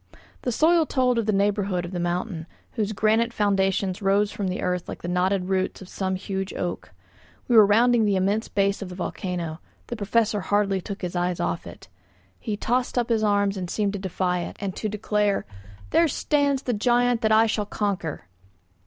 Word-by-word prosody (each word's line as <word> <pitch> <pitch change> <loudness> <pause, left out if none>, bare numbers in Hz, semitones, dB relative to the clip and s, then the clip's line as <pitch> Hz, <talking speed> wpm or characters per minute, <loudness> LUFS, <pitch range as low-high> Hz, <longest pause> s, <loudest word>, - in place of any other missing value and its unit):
The 250 - -1
soil 320 +5 +3
told 250 -3 +2
of 225 - -2
the - - +3
neighbourhood 200 -2 0
of 175 - -7
the 180 - -3
mountain, 175 -1 -2 0.2
whose 215 -3 -2
granite 220 +3 +2
foundations 195 -2 0
rose 200 +1 +2
from 200 - -3
the 185 - -3
earth 180 -1 -2
like - - -7
the - - -4
knotted 180 +1 +1
roots 190 0 -1
of 190 - -11
some 190 0 -2
huge 190 0 -4
oak. 175 -1 -4 0.6
We 240 - +2
were 215 -2 +8
rounding 230 +2 +4
the 205 -2 +2
immense 200 +4 +1
base 200 0 0
of 195 - -5
the 180 - -8
volcano. 175 -3 -4 0.3
The 240 - -5
Professor 215 0 +1
hardly 200 -1 +1
took 200 +1 -7
his 180 0 -3
eyes 175 0 0
off 175 -1 -2
it. - - -12 0.5
He 210 -2 -3
tossed 250 +4 -1
up 240 -1 +1
his 225 -2 +2
arms 200 -1 +2
and 180 -2 -4
seemed 205 0 0
to 200 - -3
defy 185 -1 -1
it, 175 - -6
and 195 -2 -4
to 215 - -3
declare, 210 -1 0 0.5
"There 335 - +4
stands 285 -1 +1
the 245 - -1
giant 240 +2 +2
that 220 - +2
I 220 +1 +6
shall 215 -2 -1
conquer." 195 -8 -3
200 Hz, 195 wpm, -25 LUFS, 185-220 Hz, 0.6 s, were